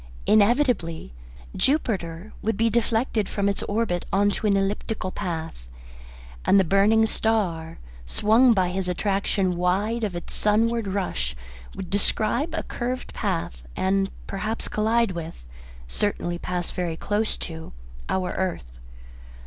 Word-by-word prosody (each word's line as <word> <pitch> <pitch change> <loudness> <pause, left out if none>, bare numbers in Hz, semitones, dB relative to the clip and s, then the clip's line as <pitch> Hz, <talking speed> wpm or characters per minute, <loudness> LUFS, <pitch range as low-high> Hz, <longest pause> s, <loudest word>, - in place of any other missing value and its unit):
Inevitably 210 - +2 0.4
Jupiter 200 - 0
would 220 -1 -1
be 225 0 +2
deflected 225 -2 +1
from 200 -1 0
its 200 - 0
orbit 205 -5 -1
into 205 +2 +2
an 200 -1 +4
elliptical 195 0 -2
path, 160 - -5 0.8
and 200 - +5
the - - +5
burning 200 +5 +4
star, 190 -8 0 0.3
swung 225 - +4
by 185 -5 +3
his 185 0 -2
attraction 195 0 0
wide 200 +6 0
of 200 -5 -1
its 175 - -5
sunward 225 +1 +2
rush, 180 - -2 0.4
would 185 -2 -6
"describe 230 - +1
a - - -2
curved 250 +1 -4
path," - - -2
and 195 +1 +1 0.2
perhaps 215 +3 -3
collide 225 0 +2
with, 160 - -7 0.4
and - - -12
certainly 175 -4 -1
pass 180 -1 -3
very 175 -3 -2
close 210 +4 0
to, 160 -2 -6 0.4
our 185 -1 0
earth. 65 - -3
200 Hz, 130 wpm, -25 LUFS, 175-220 Hz, 0.8 s, and